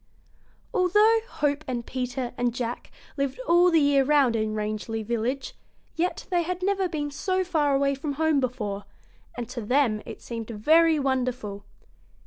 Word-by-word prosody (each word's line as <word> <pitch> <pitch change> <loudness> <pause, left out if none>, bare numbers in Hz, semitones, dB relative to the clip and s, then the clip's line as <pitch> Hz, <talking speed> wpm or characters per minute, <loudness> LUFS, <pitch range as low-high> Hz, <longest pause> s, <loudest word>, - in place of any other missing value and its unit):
] - - -35
Although 420 +5 +4
Hope 290 0 -1
and 240 -2 -3
Peter 250 -1 -3
and 245 -1 -1
Jack 240 -1 -4 0.3
lived 275 - -2
all 350 +1 +5
the 330 -2 +4
year 285 -2 +4
around 275 -4 +3
in 215 -1 -1
Rangeley 215 +1 -3
Village, 240 +4 -2 0.4
yet 355 +2 -1
they 350 -1 +3
had 365 +2 -3
never 390 -1 +1
been 295 -3 -3
so 370 +6 -1
far 300 -6 +1
away 275 0 +2
from 285 +1 -4
home 315 0 +2
before, 210 -6 -3 0.5
and 240 -2 -4
to 245 -1 -5
them 230 -1 +2
it - - -8
seemed 230 -2 -6
very 315 +9 +4
wonderful. 250 -7 -2
270 Hz, 160 wpm, -26 LUFS, 235-320 Hz, 0.5 s, all